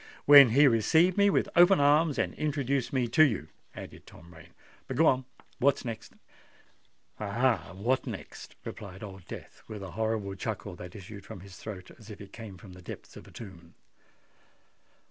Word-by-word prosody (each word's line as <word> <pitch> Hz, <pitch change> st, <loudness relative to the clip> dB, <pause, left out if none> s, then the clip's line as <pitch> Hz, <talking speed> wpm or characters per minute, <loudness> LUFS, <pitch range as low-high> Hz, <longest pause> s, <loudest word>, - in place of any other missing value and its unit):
"When 140 Hz, -3 st, +10 dB
he 140 Hz, +6 st, +5 dB
received 160 Hz, -, +3 dB
me 200 Hz, 0 st, +4 dB
with -, -, +1 dB
open 175 Hz, +1 st, +6 dB
arms, 145 Hz, +1 st, +3 dB
and -, -, -1 dB
introduced 140 Hz, -4 st, -1 dB
me 130 Hz, -3 st, 0 dB
to 140 Hz, -, +3 dB
you," 105 Hz, -, 0 dB, 0.3 s
added -, -, -10 dB
Tom 85 Hz, +1 st, -15 dB
Rain. 85 Hz, 0 st, -15 dB, 0.4 s
"But 130 Hz, -, -5 dB
go 160 Hz, -, +5 dB
on: 130 Hz, -3 st, +3 dB, 0.3 s
what 135 Hz, 0 st, +2 dB
next?" 115 Hz, -2 st, -7 dB, 1.1 s
"Ah! 105 Hz, -4 st, 0 dB
what 120 Hz, +7 st, -1 dB
next?" -, -, -8 dB
replied 95 Hz, 0 st, -8 dB
Old 95 Hz, -4 st, -10 dB
Death, -, -, -10 dB
with 105 Hz, -2 st, -7 dB
a 95 Hz, -, -8 dB
horrible 110 Hz, 0 st, -2 dB
chuckle 100 Hz, -1 st, -5 dB
that 90 Hz, 0 st, -10 dB
issued 100 Hz, 0 st, -10 dB
from 105 Hz, -2 st, -10 dB
his 95 Hz, -1 st, -12 dB
throat 95 Hz, -4 st, -9 dB
as 110 Hz, -1 st, -14 dB
if 105 Hz, -, -10 dB
it 100 Hz, -1 st, -12 dB
come 110 Hz, -5 st, -9 dB
from 95 Hz, 0 st, -13 dB
the 90 Hz, -, -13 dB
depths -, -, -10 dB
of -, -, -12 dB
a -, -, -15 dB
tomb. 85 Hz, -7 st, -12 dB
110 Hz, 180 wpm, -29 LUFS, 95-135 Hz, 1.1 s, When